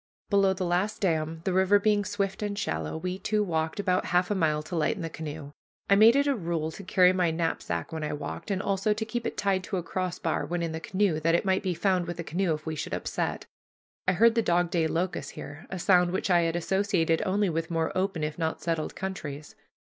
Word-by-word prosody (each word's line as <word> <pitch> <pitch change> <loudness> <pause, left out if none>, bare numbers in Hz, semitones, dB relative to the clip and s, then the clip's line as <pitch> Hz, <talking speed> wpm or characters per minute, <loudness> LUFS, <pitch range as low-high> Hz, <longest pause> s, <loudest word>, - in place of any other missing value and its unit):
Below 195 -1 +4
the 185 -1 -3
last 180 +5 0
dam, 160 -3 0
the 190 - 0
river 190 +2 +5
being 205 0 +2
swift 195 0 -2
and 205 -1 -2
shallow, 80 - -2
we 180 +3 -4
two 215 0 +1
walked 160 -2 -2
about 185 -2 +1
half 180 +2 +1
a - - +4
mile 155 -5 +1
to 175 - -6
lighten 170 +4 0
the 165 - -4
canoe. 150 -2 -7 0.4
I - - +8
made 220 +4 +7
it 280 0 +3
a 285 - +3
rule 165 -5 -2
to 200 - -9
carry 185 0 +4
my 180 -2 +2
knapsack 160 - -2
when 160 -1 -3
I 150 - -2
walked, 145 +7 -6
and 195 -1 -1
also 200 +2 +1
to 220 +1 -3
keep 230 +1 -3
it - - -5
tied 195 -2 +1
to 195 - -2
a 175 - -2
crossbar 180 -5 -2
when 175 +2 -2
in 165 - -2
the 160 - -4
canoe, 185 -1 0
that 165 +2 +2
it 170 - 0
might 190 0 +2
be 185 -3 -1
found 185 -1 +1
with 175 0 -4
the 170 - -4
canoe 170 +1 0
if 155 - -11
we 160 - -2
should 150 - -3
upset. - - -3 0.6
I 185 - +4
heard 230 +5 +5
the 230 - +2
dog 175 -3 +1
day 165 -2 +2
locust 175 +3 -2
here, 145 +2 -9
a 190 - -4
sound 180 -1 +4
which 190 +1 -1
I 175 -1 +5
had 165 0 0
associated 175 -2 +1
only 195 0 +1
with 165 0 -2
more 165 -1 -1
open, 185 -4 -1
if 150 +2 -3
not 160 -1 -1
settled 165 -2 -2
countries. 155 -6 -6
180 Hz, 240 wpm, -28 LUFS, 160-195 Hz, 0.6 s, I